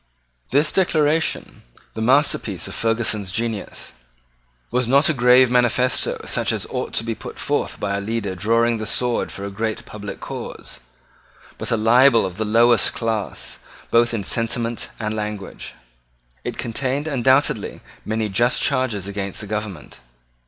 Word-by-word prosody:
This 145 +3 +3
Declaration, 160 -4 +1 0.3
the 110 - -5
masterpiece 135 +6 +2
of - - -7
Ferguson's 110 -3 0
genius, 115 0 -4 0.8
was 125 0 +1
not 140 +6 +4
a - - +3
grave 125 -1 +5
manifesto 125 +1 +2
such - - 0
as - - -2
ought - - -3
to - - 0
be 115 0 -2
put - - -9
forth - - -1
by 100 -1 -1
a 100 - -2
leader 105 -2 -3
drawing 115 +5 +1
the 110 - -4
sword 125 +1 +1
for 100 - -6
a 100 - -5
great 110 +2 -3
public 105 -1 -8
cause, - - -7 0.8
but - - -3
a 115 - +2
libel 115 +1 +5
of 90 -1 -6
the 110 - -1
lowest 115 +2 +4
class, 110 -3 -3 0.3
both 120 0 +4
in 115 -4 -2
sentiment 115 +2 -1
and 110 -1 -2
language. 105 -2 -5 0.7
It - - -5
contained 135 +5 -2
undoubtedly 130 -4 +1 0.2
many 110 0 -1
just 120 +5 +2
charges 115 -7 0
against 100 -1 -4
the 110 - -5
government. 105 -5 -6
115 Hz, 150 wpm, -21 LUFS, 105-125 Hz, 0.8 s, grave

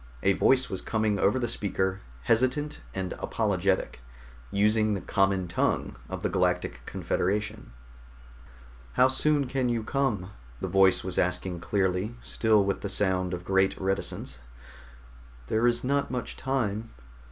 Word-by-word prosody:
A 100 - +4
voice 130 +6 +3
was 95 - -5
coming 110 -2 0
over 100 +6 +3
the 120 -2 0
speaker, 95 -3 -1 0.2
hesitant 130 - +1
and 95 -1 -3
apologetic, 95 - 0 0.5
using 105 - +2
the - - -2
common 95 -2 +1
tongue 85 - 0
of - - -5
the - - +2
Galactic - - 0
Confederation. 100 -8 -2 1.2
"How 130 - +5
soon 145 +2 +2
can 130 -1 -1
you 115 -2 0
come?" 110 -8 -1 0.3
the - - -3
voice 95 -1 +4
was 90 -1 -1
asking 90 0 -1
clearly, 95 +4 0
still 110 -3 +3
with 100 - -1
the 100 - -3
sound 95 -2 +1
of 90 -1 -5
great 95 0 +2
reticence. 95 -8 -2 1.1
"There 110 +2 +3
is 120 0 +2
not 140 +2 0
much 125 -1 -4
time." 115 -5 -2
100 Hz, 140 wpm, -28 LUFS, 95-120 Hz, 1.2 s, How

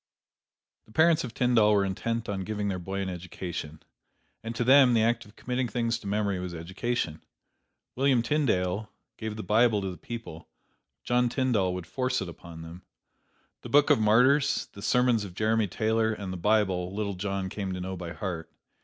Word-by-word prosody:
The - - -20
parents 160 +5 +4
of 120 -3 -7
Tyndall 115 -4 +4
were 100 -1 +3
intent 115 +4 -2
on 95 -2 -3
giving 105 0 -2
their 95 -2 -2
boy 95 +2 -4
an 95 - -2
education. 85 -3 -6 0.6
And 115 +1 -5
to 120 - 0
them, 130 -1 +6
the 110 - +4
act 120 +1 +1
of 105 - -18
committing 125 0 -2
things 115 -1 -1
to 100 - -9
memory 100 -2 0
was 90 -1 -5
education. 85 0 -3 0.7
William 130 -2 +3
Tyndale 110 -8 0 0.3
gave 110 -1 -4
the 110 - -6
Bible 110 0 +3
to 95 -1 -3
the 90 - -9
people; 115 -9 -8 0.5
John 125 0 +2
Tyndall 115 -9 +1
would 90 -2 -5
force 130 +6 -1
it 95 - -4
upon 85 -1 -10
them. 85 +2 -10 0.8
The - - -9
"Book 145 0 +5
of - - +5
Martyrs," 130 +7 +3
the 100 - -10
sermons 125 -1 +2
of 90 -3 -9
Jeremy 110 +1 +1
Taylor, 110 +3 +1
and 100 -3 -5
the - - -4
Bible, 95 -1 +1
little 105 -1 -2
John 95 0 -3
came 95 0 -4
to 90 - -4
know 95 +1 -4
by 85 -2 -6
heart. 85 -5 -5
105 Hz, 185 wpm, -28 LUFS, 95-120 Hz, 0.8 s, them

